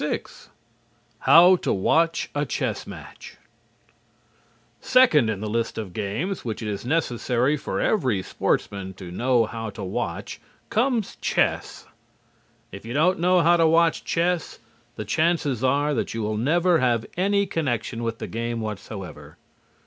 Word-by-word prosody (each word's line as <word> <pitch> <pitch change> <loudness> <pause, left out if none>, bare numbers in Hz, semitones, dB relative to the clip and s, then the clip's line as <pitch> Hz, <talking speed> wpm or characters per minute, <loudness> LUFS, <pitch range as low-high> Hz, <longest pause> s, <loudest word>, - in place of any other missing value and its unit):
VI - - -1 1.0
HOW 175 +3 +7
TO - - -2
WATCH 165 - +1
A 145 - 0
CHESS - - -3
MATCH - - -11 1.4
Second 195 - +4
in 105 -2 -3
the 110 - -3
list 115 +2 -2
of 105 -5 -5
games 110 - -3
which 115 -1 -4
it - - -4
is 100 -2 -4
necessary 125 -1 0
for 95 -9 -4
every 130 - +1
sportsman 95 0 -2
to 90 -2 -9
know 120 +4 +2
how 115 0 -5
to 100 - -8
watch 95 - -4 0.3
comes 235 -2 0
chess. - - -1 0.9
If 100 - -9
you 115 +2 -6
don't 180 +5 +3
know 180 +1 +4
how 170 +2 +4
to 165 -1 +4
watch 165 0 +3
chess, 170 -1 -1 0.4
the 110 - -5
chances 155 - 0
are 145 +3 +2
that 115 - -2
you 115 - -2
will 105 +1 -1
never 165 +9 +2
have 120 -3 +1
any 200 +2 +2
connection 125 - -2
with 115 -1 -3
the - - -5
game 115 +1 -3
whatsoever. 105 -3 -7
130 Hz, 150 wpm, -24 LUFS, 110-170 Hz, 1.4 s, HOW